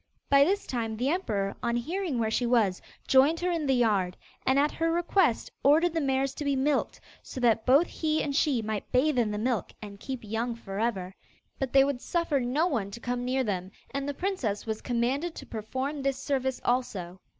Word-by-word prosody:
By 280 Hz, 0 st, +7 dB
this 395 Hz, +7 st, 0 dB
time 225 Hz, -3 st, -3 dB
the 250 Hz, +4 st, 0 dB
emperor, 215 Hz, -, -1 dB
on 235 Hz, -, 0 dB
hearing 320 Hz, +4 st, -2 dB
where 220 Hz, -1 st, 0 dB
she 240 Hz, +2 st, +1 dB
was, 220 Hz, -6 st, +2 dB, 0.3 s
joined 280 Hz, +5 st, +5 dB
her 360 Hz, 0 st, +1 dB
in 325 Hz, -4 st, -1 dB
the 265 Hz, -, +3 dB
yard, 200 Hz, -7 st, +1 dB, 0.3 s
and 265 Hz, +1 st, +4 dB
at 290 Hz, +2 st, +3 dB
her 330 Hz, 0 st, 0 dB
request 345 Hz, -, +1 dB
ordered 315 Hz, +5 st, +4 dB
the 325 Hz, -, 0 dB
mares 270 Hz, -1 st, 0 dB
to 295 Hz, -, -5 dB
be 280 Hz, -1 st, +1 dB
milked, 280 Hz, +2 st, 0 dB, 0.2 s
so -, -, -8 dB
that 230 Hz, -2 st, +2 dB
both 280 Hz, +7 st, +6 dB
he 310 Hz, -2 st, -1 dB
and 280 Hz, -2 st, -2 dB
she 275 Hz, -6 st, +2 dB
might 215 Hz, -1 st, -4 dB
bathe 260 Hz, +1 st, +3 dB
in 225 Hz, -3 st, +2 dB
the 210 Hz, -, -3 dB
milk 230 Hz, -3 st, -1 dB
and 205 Hz, -2 st, -9 dB
keep 260 Hz, 0 st, -6 dB
young 225 Hz, +3 st, -2 dB
for 195 Hz, -3 st, -7 dB
ever. 195 Hz, -5 st, -1 dB, 0.5 s
But 270 Hz, -3 st, -2 dB
they 270 Hz, 0 st, +6 dB
would 275 Hz, -3 st, -1 dB
suffer 335 Hz, -5 st, 0 dB
no 260 Hz, +6 st, +1 dB
one 230 Hz, -, -1 dB
to 200 Hz, -, -8 dB
come 245 Hz, 0 st, -3 dB
near 260 Hz, +1 st, 0 dB
them, 190 Hz, -5 st, -2 dB, 0.2 s
and 275 Hz, 0 st, -3 dB
the 285 Hz, -, -3 dB
princess 280 Hz, -, -2 dB
was 220 Hz, -1 st, -3 dB
commanded 260 Hz, +7 st, -1 dB
to -, -, -8 dB
perform 260 Hz, +6 st, -4 dB
this 275 Hz, -1 st, 0 dB
service 265 Hz, -2 st, -1 dB
also. 190 Hz, -8 st, -1 dB
260 Hz, 210 wpm, -28 LUFS, 225-290 Hz, 0.5 s, By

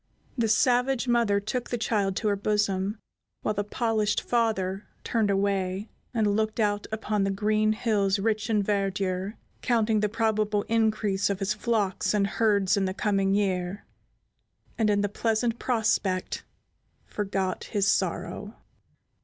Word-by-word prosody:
The 235 Hz, -4 st, +1 dB
savage 250 Hz, +3 st, +2 dB
mother 235 Hz, -4 st, +3 dB
took 235 Hz, +4 st, -3 dB
the 240 Hz, -, -1 dB
child 205 Hz, -4 st, 0 dB
to 215 Hz, -, -1 dB
her 200 Hz, -, +2 dB
bosom, 205 Hz, 0 st, 0 dB, 0.5 s
while 215 Hz, -, 0 dB
the 205 Hz, 0 st, -1 dB
polished 215 Hz, -1 st, 0 dB
father 210 Hz, -5 st, -1 dB, 0.2 s
turned 220 Hz, -3 st, +1 dB
away 195 Hz, 0 st, 0 dB, 0.2 s
and 215 Hz, -4 st, +1 dB
looked 220 Hz, +1 st, -1 dB
out 205 Hz, -1 st, +1 dB
upon 215 Hz, -2 st, -1 dB
the 195 Hz, -, +1 dB
green 215 Hz, +2 st, +1 dB
hills 210 Hz, -3 st, +1 dB
rich 215 Hz, +2 st, -1 dB
in 210 Hz, -2 st, +2 dB
verdure, 195 Hz, 0 st, -1 dB, 0.3 s
counting 225 Hz, -3 st, +2 dB
the 210 Hz, 0 st, +1 dB
probable 215 Hz, -2 st, +1 dB
increase 215 Hz, -3 st, +1 dB
of 200 Hz, -, 0 dB
his 195 Hz, +2 st, 0 dB
flocks 215 Hz, -3 st, 0 dB
and 200 Hz, -1 st, +3 dB
herds 200 Hz, -2 st, +2 dB
in 200 Hz, -1 st, +1 dB
the 185 Hz, 0 st, -2 dB
coming 195 Hz, -2 st, +1 dB
year, 190 Hz, -1 st, -1 dB, 0.9 s
and, 220 Hz, -2 st, +1 dB
in 205 Hz, -1 st, +2 dB
the 205 Hz, -, +1 dB
pleasant 225 Hz, +3 st, 0 dB
prospect, 215 Hz, -6 st, 0 dB, 0.6 s
forgot 195 Hz, -2 st, -2 dB
his 205 Hz, -3 st, 0 dB
sorrow. 205 Hz, +2 st, -1 dB
210 Hz, 145 wpm, -27 LUFS, 195-220 Hz, 0.9 s, mother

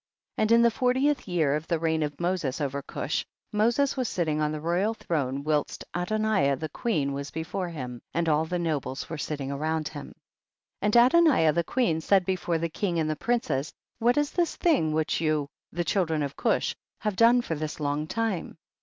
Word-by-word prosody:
3. -, -, 0 dB
And 215 Hz, -, +1 dB
in 230 Hz, 0 st, +7 dB
the 235 Hz, -, +5 dB
fortieth 260 Hz, +4 st, +1 dB
year 160 Hz, -6 st, +2 dB
of 155 Hz, +2 st, -4 dB
the 170 Hz, -, +1 dB
reign 160 Hz, 0 st, 0 dB
of 145 Hz, -1 st, -3 dB
Moses 170 Hz, -6 st, -1 dB
over 140 Hz, -1 st, -2 dB
Cush, -, -, -3 dB, 0.3 s
Moses 235 Hz, +6 st, +2 dB
was 255 Hz, -4 st, -1 dB
sitting 155 Hz, -4 st, 0 dB
on 150 Hz, 0 st, +1 dB
the 155 Hz, -, -3 dB
royal 180 Hz, +8 st, 0 dB
throne 140 Hz, -8 st, -2 dB
whilst 150 Hz, -1 st, -1 dB
Adoniah 180 Hz, -6 st, +1 dB
the 155 Hz, +3 st, -4 dB
queen 150 Hz, -7 st, -1 dB
was 140 Hz, 0 st, -4 dB
before 175 Hz, +4 st, -4 dB
him, 125 Hz, -7 st, -6 dB
and 170 Hz, 0 st, -1 dB
all 155 Hz, 0 st, +3 dB
the 175 Hz, +2 st, -2 dB
nobles 155 Hz, -6 st, -2 dB
were 165 Hz, -, -4 dB
sitting 140 Hz, -1 st, -3 dB
around 155 Hz, +2 st, -1 dB
him. 145 Hz, -2 st, -9 dB, 0.7 s
4. 205 Hz, -, 0 dB
And 210 Hz, -, +1 dB
Adoniah 255 Hz, -, +5 dB
the 170 Hz, +2 st, +1 dB
queen 170 Hz, -6 st, 0 dB
said 190 Hz, +2 st, +3 dB
before 180 Hz, -2 st, 0 dB
the 165 Hz, +1 st, -1 dB
king 175 Hz, +2 st, -2 dB
and 155 Hz, -1 st, +1 dB
the -, -, -1 dB
princes, 155 Hz, -, -1 dB, 0.3 s
what 240 Hz, +4 st, +3 dB
is 295 Hz, -1 st, +1 dB
this 345 Hz, -2 st, 0 dB
thing 280 Hz, -, +2 dB
which 155 Hz, +1 st, 0 dB
you, 155 Hz, -3 st, +1 dB, 0.2 s
the 175 Hz, +2 st, -1 dB
children 165 Hz, -6 st, +1 dB
of 140 Hz, -1 st, -4 dB
Cush, -, -, 0 dB, 0.3 s
have 210 Hz, -2 st, -1 dB
done 235 Hz, +3 st, +5 dB
for 165 Hz, -, -3 dB
this 155 Hz, 0 st, -4 dB
long 145 Hz, +1 st, -1 dB
time 220 Hz, -5 st, -2 dB
165 Hz, 200 wpm, -27 LUFS, 150-215 Hz, 0.7 s, in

